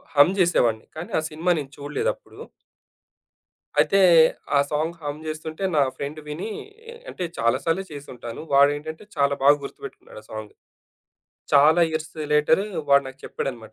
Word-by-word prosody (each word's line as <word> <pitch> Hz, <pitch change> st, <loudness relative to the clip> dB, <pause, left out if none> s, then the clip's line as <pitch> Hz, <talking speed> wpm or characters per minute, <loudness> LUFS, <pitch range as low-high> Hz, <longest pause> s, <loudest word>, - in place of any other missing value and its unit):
హమ్ 145 Hz, +7 st, +6 dB
జేసేవాడిని. 120 Hz, -11 st, +2 dB
కానీ, 165 Hz, -, -7 dB
ఆ -, -, -2 dB
సినిమా 165 Hz, +4 st, 0 dB
నేను 140 Hz, -1 st, -7 dB
చూడలేదప్పుడు. -, -, -4 dB, 1.4 s
అయితే, 195 Hz, -, +4 dB, 0.6 s
ఆ -, -, +5 dB
సాంగ్ 160 Hz, +3 st, -1 dB
హమ్ 145 Hz, 0 st, -5 dB
జేస్తుంటే, 155 Hz, +3 st, -5 dB
నా 145 Hz, -, +5 dB, 0.2 s
ఫ్రెండ్ 145 Hz, +2 st, -5 dB
వినీ 160 Hz, +9 st, -5 dB, 0.6 s
అంటే, 180 Hz, -, -5 dB
చాలా 115 Hz, 0 st, +2 dB
సార్లే 170 Hz, +4 st, 0 dB
చేసుంటాను. 125 Hz, -4 st, -8 dB
వాడేంటంటే 145 Hz, +5 st, +2 dB
చాలా 140 Hz, -1 st, +2 dB
బాగా 145 Hz, +1 st, +7 dB
గుర్తుపెట్టుకున్నాడు 110 Hz, -, -10 dB
ఆ -, -, -22 dB
సాంగ్. 110 Hz, -1 st, -7 dB, 1.0 s
చాలా 155 Hz, +4 st, +6 dB
ఇయర్స్ 155 Hz, 0 st, -4 dB, 0.2 s
లేటర్ 150 Hz, +5 st, +4 dB, 0.3 s
వాడు 140 Hz, 0 st, +6 dB
నాకు 135 Hz, 0 st, -10 dB
చెప్పాడనమాట. 115 Hz, -5 st, -5 dB
150 Hz, 135 wpm, -24 LUFS, 140-160 Hz, 1.4 s, బాగా